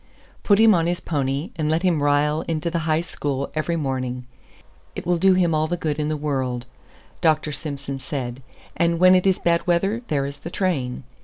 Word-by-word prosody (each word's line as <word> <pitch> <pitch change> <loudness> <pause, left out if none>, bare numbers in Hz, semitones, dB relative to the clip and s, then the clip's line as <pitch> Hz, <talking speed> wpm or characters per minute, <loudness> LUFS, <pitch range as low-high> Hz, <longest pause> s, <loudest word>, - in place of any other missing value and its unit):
"Put 200 - +4
him 220 0 +6
on 170 -2 +2
his 175 0 0
pony, 140 - -2
and 155 -2 0
let 160 +3 +1
him 170 -5 +2
ride 145 +1 +2
into 165 +1 -2
the 170 - 0
High 155 +1 +3
School 140 -5 -3
every 155 +2 -1
morning; 130 -4 -3 0.7
it - - -6
will 175 -1 +1
do 190 +1 +5
him 175 -3 +2
all 155 0 +1
the 175 +2 -2
good 155 -2 -2
in 150 0 -1
the 155 - -1
world," 130 -4 -2 0.6
Dr. 155 -2 +2
Simson 140 -2 -5
said; 130 -2 -5 0.3
"and 170 0 +1
when 185 +2 +6
it 185 +1 +3
is 190 - +3
bad 170 0 +1
weather, 195 +6 +1
there 140 -3 0
is 140 0 -6
the 170 - -8
train." 145 -10 -2
155 Hz, 205 wpm, -23 LUFS, 140-175 Hz, 0.7 s, him